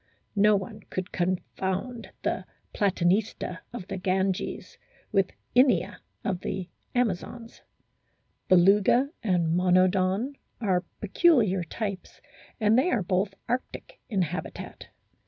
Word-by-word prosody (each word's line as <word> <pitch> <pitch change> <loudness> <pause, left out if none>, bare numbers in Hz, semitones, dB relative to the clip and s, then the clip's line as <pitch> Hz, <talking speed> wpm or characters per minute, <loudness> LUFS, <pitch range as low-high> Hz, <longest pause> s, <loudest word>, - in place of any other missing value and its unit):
No 210 +1 +5
one 210 +2 -4
could 185 0 -4
confound 190 +5 -2
the - - -1 0.3
Platanista 190 -1 0
of 235 -6 -7
the 195 - -5
Ganges 190 0 -1 0.3
with 195 -1 +2 0.3
Inia 255 +1 +4 0.3
of 185 -3 -1
the 185 0 -4 0.3
Amazons. 230 +1 -2 0.9
Beluga 200 +9 +5
and 175 -5 +1
Monodon 185 +7 +2 0.2
are 185 -6 +1 0.2
peculiar 210 - +3
types, 200 +2 -5 0.4
and 220 +2 +4
they 295 - +2
are 230 - +1
both 190 +2 0
Arctic 255 - -4
in 195 -5 +1
habitat. 175 +2 -6
195 Hz, 105 wpm, -27 LUFS, 185-225 Hz, 0.9 s, No